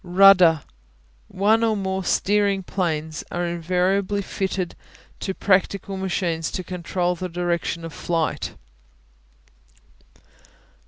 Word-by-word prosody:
Rudder 180 Hz, -4 st, +6 dB, 0.6 s
One 215 Hz, +4 st, +2 dB
or 220 Hz, -2 st, +2 dB
more 190 Hz, -1 st, -2 dB
steering 200 Hz, +1 st, +1 dB
planes 160 Hz, -4 st, -2 dB
are 175 Hz, 0 st, -2 dB
invariably 185 Hz, +4 st, 0 dB
fitted 190 Hz, -2 st, -3 dB, 0.4 s
to 190 Hz, -, -3 dB
practical 195 Hz, 0 st, +1 dB
machines 175 Hz, -4 st, -1 dB
to 185 Hz, -, -3 dB
control 180 Hz, 0 st, -2 dB
the 180 Hz, +1 st, -5 dB
direction 170 Hz, -1 st, -2 dB
of 165 Hz, -, -8 dB
flight. 165 Hz, 0 st, -2 dB
185 Hz, 100 wpm, -23 LUFS, 170-195 Hz, 0.6 s, Rudder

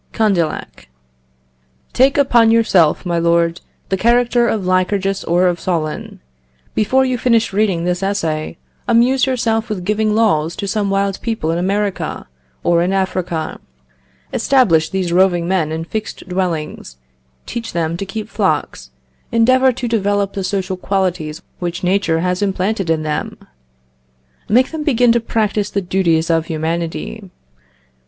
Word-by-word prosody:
Condillac. 185 Hz, -, -1 dB, 1.1 s
"Take 265 Hz, +3 st, +3 dB
upon 240 Hz, -5 st, +4 dB
yourself, 195 Hz, -9 st, +3 dB
my 170 Hz, -1 st, 0 dB
lord, 170 Hz, 0 st, +1 dB, 0.3 s
the 190 Hz, -, 0 dB
character 240 Hz, +2 st, +3 dB
of 210 Hz, -4 st, -1 dB
Lycurgus 195 Hz, +1 st, 0 dB
or 175 Hz, +2 st, +2 dB
of 175 Hz, -1 st, +1 dB
Solon. 160 Hz, -4 st, -3 dB, 0.5 s
Before 260 Hz, +5 st, +2 dB
you 255 Hz, -2 st, -1 dB
finish 230 Hz, -4 st, +2 dB
reading 195 Hz, -5 st, +1 dB
this 180 Hz, +1 st, -1 dB
essay, 165 Hz, -6 st, -2 dB, 0.3 s
amuse 255 Hz, +3 st, +3 dB
yourself 230 Hz, -3 st, 0 dB
with 200 Hz, -4 st, -3 dB
giving 210 Hz, +2 st, 0 dB
laws 170 Hz, -8 st, +2 dB
to 200 Hz, -, -4 dB
some 205 Hz, 0 st, -1 dB
wild 195 Hz, 0 st, 0 dB
people 220 Hz, -9 st, -2 dB
in 170 Hz, -, -1 dB
America 200 Hz, +2 st, -2 dB, 0.4 s
or 170 Hz, -1 st, +3 dB
in 180 Hz, +2 st, 0 dB
Africa. 185 Hz, -4 st, -2 dB, 0.7 s
Establish 190 Hz, -, +3 dB
these 185 Hz, -3 st, -2 dB
roving 175 Hz, -2 st, +3 dB
men 175 Hz, -5 st, 0 dB
in 160 Hz, +1 st, -3 dB
fixed 215 Hz, +2 st, -6 dB
dwellings; 170 Hz, -, -3 dB, 0.5 s
teach 230 Hz, -1 st, -5 dB
them 165 Hz, -1 st, -1 dB
to 195 Hz, -, -4 dB
keep 210 Hz, +2 st, -5 dB
flocks.... -, -, -1 dB, 0.4 s
Endeavour 255 Hz, +3 st, +4 dB
to 245 Hz, 0 st, -4 dB
develop 205 Hz, -3 st, 0 dB
the 195 Hz, -, -3 dB
social 190 Hz, 0 st, -2 dB
qualities 180 Hz, -5 st, -2 dB, 0.2 s
which 175 Hz, 0 st, -4 dB
nature 180 Hz, -3 st, +1 dB
has 180 Hz, +1 st, -1 dB
implanted 195 Hz, -1 st, -1 dB
in 160 Hz, -1 st, +1 dB
them.... 150 Hz, -1 st, -3 dB, 1.1 s
Make 250 Hz, +5 st, +3 dB
them 320 Hz, -1 st, -4 dB
begin 245 Hz, -5 st, +3 dB
to 235 Hz, -, +3 dB
practise 210 Hz, -2 st, -1 dB
the 200 Hz, -, -1 dB
duties 175 Hz, -3 st, +1 dB
of 165 Hz, -1 st, +1 dB
humanity.... 160 Hz, -, -4 dB
190 Hz, 140 wpm, -17 LUFS, 170-220 Hz, 1.1 s, upon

